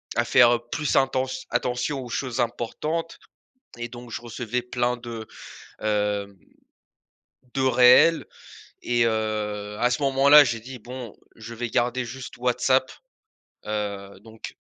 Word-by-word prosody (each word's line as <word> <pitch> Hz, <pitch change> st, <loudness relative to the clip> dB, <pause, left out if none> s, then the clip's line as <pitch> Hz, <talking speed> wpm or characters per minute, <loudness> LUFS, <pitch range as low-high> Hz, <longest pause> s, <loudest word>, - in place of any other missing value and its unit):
à -, -, +2 dB
faire, 120 Hz, 0 st, +6 dB
heu, 120 Hz, -, -3 dB
plus 150 Hz, -3 st, -1 dB
intent 130 Hz, -1 st, +2 dB, 0.2 s
attention 125 Hz, +3 st, -1 dB
aux -, -, -9 dB
choses 125 Hz, -1 st, -3 dB
importantes 155 Hz, +8 st, -3 dB, 0.6 s
et 120 Hz, -, -4 dB
donc 120 Hz, 0 st, -11 dB
je -, -, -5 dB
recevais 120 Hz, +1 st, -4 dB
plein 125 Hz, 0 st, -1 dB
de, 115 Hz, -2 st, -8 dB, 0.5 s
hem, 105 Hz, -1 st, -1 dB, 1.2 s
de 135 Hz, -, -1 dB
réels 130 Hz, +5 st, +6 dB, 0.6 s
et 120 Hz, -1 st, +1 dB
heu, 105 Hz, -2 st, -2 dB
à 125 Hz, -, +3 dB
ce 125 Hz, -, -1 dB
moment-là, 140 Hz, +2 st, +7 dB
j'ai 115 Hz, -3 st, -2 dB
dit: 125 Hz, +2 st, -10 dB
«Bon, 125 Hz, -1 st, -9 dB, 0.2 s
je 115 Hz, +1 st, -9 dB
vais 120 Hz, +1 st, -4 dB
garder 120 Hz, +2 st, 0 dB
juste 125 Hz, +3 st, -9 dB
WhatsApp», 125 Hz, +2 st, +1 dB, 0.7 s
heu 100 Hz, -2 st, -4 dB
donc 110 Hz, 0 st, -10 dB
120 Hz, 135 wpm, -24 LUFS, 110-130 Hz, 1.2 s, moment-là